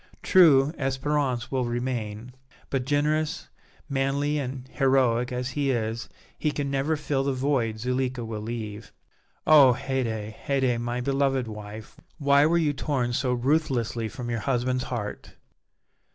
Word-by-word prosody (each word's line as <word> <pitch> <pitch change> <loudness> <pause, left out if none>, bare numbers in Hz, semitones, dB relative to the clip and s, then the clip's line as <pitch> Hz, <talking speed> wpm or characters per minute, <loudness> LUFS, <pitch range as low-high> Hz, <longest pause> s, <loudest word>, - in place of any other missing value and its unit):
True, 150 -7 +6
Espérance 135 -2 -1
will 130 -2 0
remain, 120 -1 -3 0.4
but, 130 -2 -1
generous, 150 +2 0 0.4
manly 140 +1 0
and 130 -1 -5
heroic 130 -3 +2
as 125 +1 -2
he 140 +1 -1
is, 115 -2 -2 0.3
he 155 - +1
can 145 -2 -3
never 140 +3 +1
fill 140 -2 -1
the 140 0 0
void 130 -4 0
Zuleika 125 0 -1
will 110 -1 -5
leave. 110 -1 -6 0.5
Oh! 140 -6 +7
Haydée, 115 -5 -2
Haydée, 130 -1 0
my 120 +1 -2
beloved 135 -1 +1
wife, 105 0 -9 0.2
why 140 -1 +4
were 170 +2 +3
you 155 -3 +2
torn 135 -4 -1
so 125 +1 0
ruthlessly 120 -4 0
from 120 -1 -6
your 115 - -1
husband's 125 +1 0
heart!" 105 -4 -5
130 Hz, 140 wpm, -26 LUFS, 120-140 Hz, 0.5 s, Oh